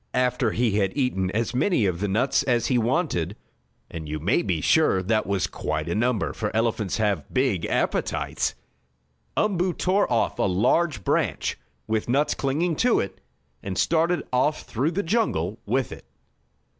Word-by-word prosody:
After 125 -1 +2
he 110 -1 +1
had 95 +3 -1
eaten 95 -9 0
as 115 +5 -1
many 130 - +2
of 90 -3 -1
the 105 - -1
nuts 115 +8 +2
as 125 -4 +1
he 125 - +2
wanted 115 - 0 0.6
(and 80 -2 -6
you 75 0 -3
may 85 +7 +2
be 90 -6 -1
sure 95 - +3
that 110 +3 +1
was 100 -2 +1
quite 75 +1 -3
a 85 - -1
number, 115 0 0
for 105 - -2
elephants 110 -4 0
have 105 -8 -1
big 125 -10 +1
appetites) - - -1 0.8
Umboo 185 -3 +1
tore 185 -3 +1
off 115 - +1
a - - +2
large 105 - +2
branch, - - 0 0.3
with 110 +1 -1
nuts 140 +4 +2
clinging 155 +5 0
to 245 -1 +3
it 95 -1 -4 0.4
and 95 -2 -5
started 170 +2 +2
off 145 +5 +1
through 130 +7 -1
the 190 +4 -2
jungle 120 - 0
with 130 -2 0
it. - - -10
115 Hz, 165 wpm, -25 LUFS, 95-145 Hz, 0.8 s, sure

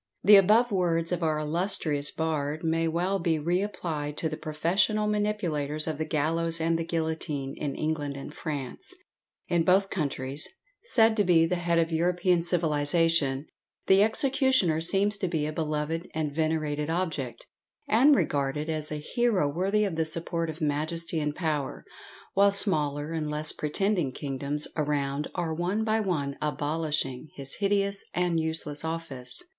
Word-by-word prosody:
The 205 +2 +8
above 215 +5 +5
words 170 -3 +1
of 180 -1 -1
our 155 -2 +1
illustrious 155 -2 0
bard 155 -1 -2
may 165 0 +1
well 180 +4 0
be 165 -1 +1
re 175 +5 0
applied 155 -7 -4
to 160 - -1
the 155 - -4
professional 170 +8 +1
manipulators 180 -9 -1
of 155 -2 -3
the 155 - -1
gallows 165 +2 0
and 165 +1 +1
the - - -1
guillotine, 160 -4 -3
in 140 -2 -3
England 150 -3 -2
and 140 +2 -8
France. 145 -6 -6 0.5
In 170 -1 +2
both 190 +3 +3
countries, 140 -4 -2 0.4
said 225 - +4
to 205 - +4
be 170 -3 +4
the 180 +2 0
head 170 -1 0
of 165 0 +2
European 175 +1 +2
civilization, 160 -3 +2 0.4
the 190 +1 +5
executioner 260 - +2
seems 200 +4 +2
to 190 - 0
be 160 -4 -1
a 155 - -3
beloved 155 +2 -2
and 155 -2 -2
venerated 155 -1 -1
object, 155 -9 -3 0.4
and 265 +7 +5
regarded 145 - 0
as 155 -1 -3
a - - -2
hero 190 +3 +1
worthy 190 +8 +1
of 190 -6 -2
the 160 - +1
support 165 0 -2
of 160 +2 -7
majesty 160 +3 -1
and 150 -1 -2
power, 155 -5 -2 0.5
while 200 +1 +5
smaller 150 -7 +2
and 155 -2 -2
less 150 +1 -2
pretending 175 0 0
kingdoms 140 +2 -1
around 145 -1 -1
are, 170 -3 -1
one 180 +7 -1
by 220 0 +1
one, 150 -9 -2
abolishing 150 -2 -2
his 135 -1 -4
hideous 200 -1 0
and 175 -2 +1
useless 160 -2 -3
office. 160 - -5
160 Hz, 155 wpm, -27 LUFS, 150-180 Hz, 0.5 s, The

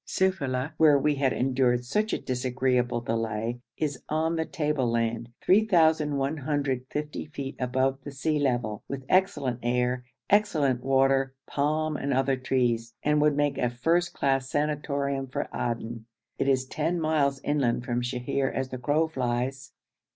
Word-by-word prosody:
Sufeila, 145 -8 0
where 155 -3 +6
we 150 +2 +2
had 135 -2 +1
endured 125 -1 +1
such 210 - 0
a - - +1
disagreeable 125 -1 0
delay, 115 0 -2 0.2
is 145 -4 -2
on 160 +2 +1
the 160 0 0
tableland, 120 -7 -1
3,150 150 - +1
feet 140 -2 -6
above 130 +1 0
the - - -6
sea 150 +2 -1
level, 120 -6 0
with 135 -1 -6
excellent 140 -10 +1
air, 125 +1 0 0.2
excellent 155 -12 +2
water, 135 0 +2
palm 155 +2 0
and 140 -1 -1
other 135 +1 +2
trees, 120 -3 0
and 150 0 +3
would 150 -1 +3
make 145 -1 +1
a 125 - +2
first 165 +9 +1
class 135 -1 0
sanatorium 140 -2 -1
for 130 - -3
Aden. 115 -1 -3 0.3
It - - +1
is 130 -1 +2
ten 170 +6 -1
miles 150 -4 +1
inland 130 -5 0
from 120 -1 -1
Sheher 125 +2 -1
as 135 -1 -3
the 130 - -6
crow 150 +6 +2
flies. 130 -1 -2
135 Hz, 145 wpm, -27 LUFS, 125-150 Hz, 0.3 s, where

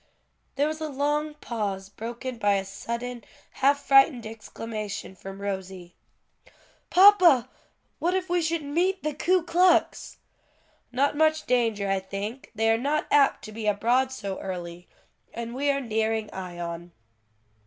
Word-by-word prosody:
There 285 +2 +2
was 310 +1 -4
a 310 - -3
long 295 +2 -1
pause 205 -8 -4
broken 235 +4 -7
by 205 -2 +3
a 195 0 -1
sudden, 235 +4 -5 0.4
half 280 +1 +3
frightened 270 -3 +5
exclamation 215 -2 -6
from 195 +1 -9
Rosie. 190 -3 -6 0.9
"Papa! 365 - +7 0.5
what 350 +3 +1
if 375 -1 -1
we 355 0 +1
should 325 -1 -1
meet 350 +6 0
the 305 0 -1
Ku 360 +4 +2
Klux!" 350 +1 +2 0.7
"Not 275 +4 +1
much 315 0 +2
danger, 225 -5 +1
I 195 0 +1
think: 200 +6 -6
they 225 +1 +2
are 225 - +2
not 290 +4 0
apt 285 -2 +4
to 215 - -8
be 215 0 -5
abroad 240 +6 +2
so 200 -7 -5
early. 175 -2 -6 0.5
And 235 0 -5
we 280 +3 0
are 280 0 +2
nearing 220 -3 -1
Ion." 175 -2 -6
235 Hz, 145 wpm, -26 LUFS, 200-295 Hz, 0.9 s, Papa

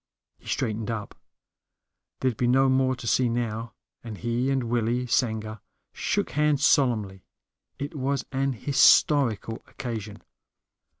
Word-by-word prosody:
He - - -19
straightened 110 0 -2
up 110 -3 -5 1.1
there'd 130 -3 +1
be 120 - 0
no 135 +2 +4
more 130 0 +2
to 125 - -10
see 125 +1 +2
now 115 -1 -3 0.3
and 110 -3 -7
he 120 +4 -1
and 135 -2 0
Willie 120 +1 0
Sanger 110 -3 -1 0.3
shook - - -1
hands 150 -1 +2
solemnly. 110 -8 +2 0.5
It 145 +4 -5
was 140 -1 -2
an 135 0 0
historical 125 -2 +3
occasion. 110 -5 -7
120 Hz, 125 wpm, -26 LUFS, 110-135 Hz, 1.1 s, no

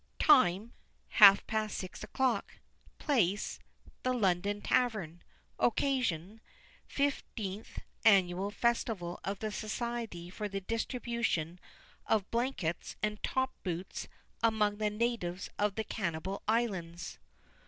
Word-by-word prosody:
TIME: 230 - +5 0.5
half 200 -1 +10
past 215 -1 -1
six 185 +1 -6
o'clock. 240 -1 0 0.4
Place: 210 - +1 0.4
The 255 0 0
London 200 -1 +1
Tavern. 205 -9 0 0.4
Occasion: 225 - 0 0.5
Fifteenth 225 -7 -3 0.3
Annual 190 -2 +4
Festival 210 -5 -1
of 195 +1 -2
the 215 +2 -3
Society 215 -5 -4
for 210 +2 -4
the 195 0 -3
Distribution 225 -6 -2 0.5
of 210 -3 +1
Blankets 230 -9 -2
and 210 -1 -1
Top 260 0 0
Boots 180 0 -4 0.3
among 215 -2 +2
the 215 0 +1
Natives 210 -5 -2
of 205 -1 +1
the 220 - -1
Cannibal 190 -3 -3
Islands. 190 -7 -1
210 Hz, 105 wpm, -32 LUFS, 185-235 Hz, 0.5 s, half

